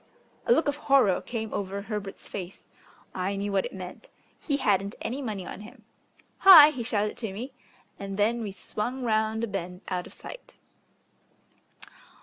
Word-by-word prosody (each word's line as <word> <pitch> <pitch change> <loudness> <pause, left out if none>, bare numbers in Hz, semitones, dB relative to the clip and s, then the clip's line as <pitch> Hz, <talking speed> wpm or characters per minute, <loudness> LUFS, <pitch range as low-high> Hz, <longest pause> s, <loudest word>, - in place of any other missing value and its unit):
A - - +3
look 325 -10 +4
of 290 0 0
horror 270 -10 +3
came 220 -2 -5
over 200 0 -3
Herbert's 205 -2 -6
face. 185 -1 -7 0.5
I 190 +2 -2
knew 200 +1 -2
what 195 -1 +1
it - - -5
meant. 185 -1 -8 0.3
He 285 -3 -1
hadn't 200 -4 +1
any 260 +5 -3
money 210 -7 -4
on 195 - -8
him. 215 - -13 0.6
"Hi!" 320 -6 +10
he 260 -5 -5
shouted 215 -3 -1
to 220 -4 -4
me, 245 +7 -7 0.5
and 195 -1 -5
then 225 +3 +2
we 210 -3 -4
swung 240 +6 -4
round 220 -1 +1
a - - 0
bend 180 -2 -5
out 180 -1 -2
of - - -13
sight.... - - -11
210 Hz, 165 wpm, -27 LUFS, 195-245 Hz, 0.6 s, Hi